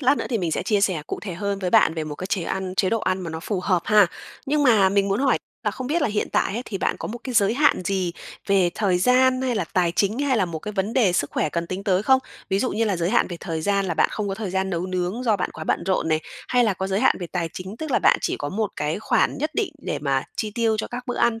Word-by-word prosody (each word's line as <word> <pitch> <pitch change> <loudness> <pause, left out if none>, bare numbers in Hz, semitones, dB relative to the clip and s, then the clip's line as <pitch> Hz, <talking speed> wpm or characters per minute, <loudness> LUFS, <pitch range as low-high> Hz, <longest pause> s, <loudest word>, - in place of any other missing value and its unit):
lát 270 +1 +3
nữa - - -3
thì 235 - 0
mình 170 -4 -1
sẽ - - -1
chia 210 -3 +1
sẻ 180 -7 +1
cụ - - -4
thể 190 -5 -5
hơn 200 +2 -2
với 180 -2 -2
bạn 160 - +5
về 160 -1 -3
một 150 -1 -5
cái 185 - -6
chế 195 -4 -1
ăn, 185 +1 -3
chế 190 - +2
độ 225 - +1
ăn 185 -1 0
mà 170 -3 -5
nó 160 0 -5
phù 190 0 -2
hợp 180 -2 +1
ha. 210 -3 +5 0.4
Nhưng 295 +1 +2
mà 220 -7 +5
mình 200 0 +2
muốn 200 +6 0
hỏi 270 -2 +3 0.3
là 210 - +2
không 255 +5 -6
biết 320 +3 0
là - - +2
hiện 210 0 -1
tại - - +1
ấy 240 - -2
thì 195 - -5
bạn - - 0
có - - -5
một 240 +3 -5
cái 255 -2 -4
giới 210 +1 +4
hạn 290 -9 +3
gì 185 -2 -1 0.3
về 190 -3 +3
thời 190 -4 +1
gian 255 +4 +3
hay 250 -2 0
là 200 -5 0
tài 175 0 0
chính 210 +5 +1
hay 280 -3 +1
là 195 - +2
một 170 -3 -5
cái 210 +6 -6
vấn 200 +3 -1
đề 210 -9 +3
sức 145 -5 0
khỏe - - 0
cần 170 +2 -3
tính 190 +3 -5
tới 190 -1 +2
không? 265 +3 +5 0.3
Ví 195 - +2
dụ 255 - 0
như 225 +2 0
là 200 -4 0
giới 170 +2 0
hạn 240 - +3
về 175 - -5
thời 165 -3 -3
gian 200 +1 +1
là 175 - -1
bạn - - +3
không 210 -2 -2
có 195 - -2
thời 205 -2 -4
gian 190 +1 -1
nấu 175 +1 -2
nướng 185 +6 -2
do 220 -4 +2
bạn 180 - -2
quá 160 - -7
bận - - 0
rộn 185 -3 +1
này, 155 0 +2 0.3
hay 245 -1 +3
là 210 -4 +1
có 190 - -3
giới 195 +1 0
hạn - - +4
về 175 - -3
tài 170 -3 -1
chính, 190 +4 -7
tức 315 +1 -5
là - - +3
bạn - - +4
chỉ - - -1
có 145 - -3
một 210 +3 -2
cái 150 +5 -1
khoản - - +1
nhất 305 +2 -1
định 410 -7 -1
để 150 - -3
mà 135 -2 0
chi 215 - -2
tiêu 225 -2 +1
cho - - -2
các 245 +1 -5
bữa 245 - -3
ăn 225 -1 +2
195 Hz, 315 wpm, -23 LUFS, 180-230 Hz, 0.4 s, bạn